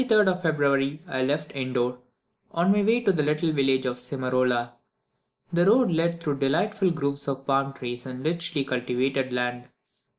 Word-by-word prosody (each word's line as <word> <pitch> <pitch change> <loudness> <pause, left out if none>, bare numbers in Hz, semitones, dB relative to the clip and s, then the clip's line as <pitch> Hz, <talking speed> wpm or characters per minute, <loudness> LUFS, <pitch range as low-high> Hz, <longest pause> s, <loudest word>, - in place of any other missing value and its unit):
On 255 - -1
the 225 - +4
23rd 210 -2 +5
of 180 0 -1
February 145 -3 +1
I 130 -6 -2
left 145 +3 -1
Indor 125 -2 -1 0.6
on 175 +3 +3
my 205 +1 +3
way 225 +4 +3
to 210 -4 +3
the 160 - +1
little 150 +2 +1
village 135 -2 +2
of 125 -1 -2
Simarola. 125 -1 -1 0.8
The 175 +2 +3
road 235 0 +5
led 170 +1 +1
through 145 -3 -2
delightful 185 +8 +1
groves 140 -3 -2
of 135 -1 -3
palm 135 0 +1
trees 120 -2 -6
and 130 +1 -7
richly 165 -3 -1
cultivated 130 +1 -1
land. 125 0 -2
140 Hz, 175 wpm, -26 LUFS, 130-170 Hz, 0.8 s, 23rd